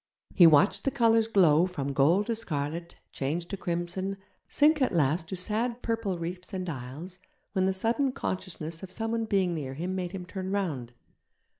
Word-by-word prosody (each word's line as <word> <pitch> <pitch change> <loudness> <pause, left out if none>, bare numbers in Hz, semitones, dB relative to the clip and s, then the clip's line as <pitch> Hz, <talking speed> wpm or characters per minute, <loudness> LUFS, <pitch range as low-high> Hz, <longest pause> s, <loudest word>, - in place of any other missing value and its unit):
He 175 -4 +8
watched 155 +4 +4
the - - +2
colours 230 -3 +3
glow 180 -6 +4
from 140 -7 -4
gold 165 +9 +3
to 230 - -1
scarlet, 165 -4 -4 0.2
change 155 +6 -2
to 200 - -3
crimson, 185 +2 -3 0.3
sink 300 0 +4
at 255 - +2
last 160 +2 +1
to 190 - -4
sad 230 +6 -1
purple 225 -5 -1
reefs 180 +3 -5
and 185 -1 -3
isles, 150 +6 -7 0.3
when 190 -2 +2
the - - +3
sudden 235 +8 +1
consciousness 170 -7 -4
of 190 -1 -9
someone 225 +2 -2
being 190 -4 +1
near 135 -5 -4
him 175 +5 -3
made 180 -2 -3
him 185 -2 -6
turn 190 0 -5
round. 155 -12 -2
185 Hz, 175 wpm, -28 LUFS, 165-210 Hz, 0.3 s, He